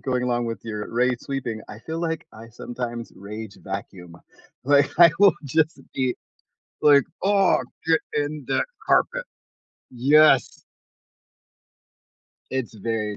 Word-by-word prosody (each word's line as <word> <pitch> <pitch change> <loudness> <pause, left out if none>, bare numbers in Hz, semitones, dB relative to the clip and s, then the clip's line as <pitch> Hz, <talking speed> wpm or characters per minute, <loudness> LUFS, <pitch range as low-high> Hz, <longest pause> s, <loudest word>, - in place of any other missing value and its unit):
going 125 -1 -1
along 120 -1 0
with 115 - -4
your 105 -1 -5
rage-sweeping- 125 -1 -1
I 105 - -9
feel 160 +4 -5
like 165 -2 -3
I 115 +1 -12
sometimes 120 0 -6
rage-vacuum. 100 -4 -8 0.5
Like, 140 0 +4
I 170 -2 +9
will 200 -4 +6
just 155 +1 0
be 130 -2 0 0.7
like, 145 -2 +6 0.2
"Oh, 195 -1 +3 0.2
get 160 -1 +3
in 145 -1 -2
that - - +1 0.2
carpet." - - +2 0.7
Yes. 145 +5 +4 1.9
It's 130 -4 -3
very 105 -1 -3
125 Hz, 115 wpm, -24 LUFS, 115-150 Hz, 1.9 s, I